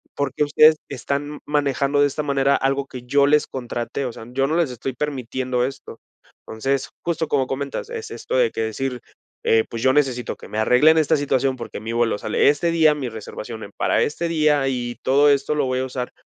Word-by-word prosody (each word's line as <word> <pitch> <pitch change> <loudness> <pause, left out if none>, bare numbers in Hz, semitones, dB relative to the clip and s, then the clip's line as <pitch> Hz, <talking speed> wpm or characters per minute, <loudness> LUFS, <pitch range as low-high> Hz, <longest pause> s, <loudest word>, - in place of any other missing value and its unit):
¿porque 140 0 -1
ustedes 155 +2 +6
están 140 +3 -4
manejando 145 -1 +1
de 145 - +5
esta 145 +2 -3
manera 140 -1 +2
algo 135 +1 0
que 125 - -8
yo 140 +3 +3
les 150 +1 +4
contraté?, 120 +1 -4
o 125 - -3
sea, 110 - -10
yo 135 +2 +1
no 155 - 0
les 165 -6 +1
estoy 125 +2 -5
permitiendo 130 -2 -2
esto, 135 -3 -8 0.5
entonces, 135 +5 -2
justo 165 -2 -1
como 135 -2 +2
comentas, 140 - -4
es 450 -2 -6
esto - - -3
de - - +3
que - - -3
decir: 125 +3 -3 0.4
"Eh, 110 0 +3
pues, 115 - -5
yo 130 - +5
necesito 130 -4 0
que - - -12
me 105 - -6
arreglen 135 +8 +5
esta 160 0 +3
situación, 135 -2 0
porque 120 - -7
mi 110 +1 -5
vuelo 115 -2 +1
sale 105 - +1
este 160 +4 +1
día, 160 -2 +4
mi 135 -4 -4
reservación 110 0 -8
en 100 - -10
para - - +1
este 165 +3 -1
día, 150 -4 +2
y 120 -2 -3
todo 145 +2 +4
esto 140 +1 +2
lo 145 -2 +1
voy 130 0 -1
a 130 - -1
usar 125 -1 -5
135 Hz, 210 wpm, -22 LUFS, 125-150 Hz, 0.5 s, ustedes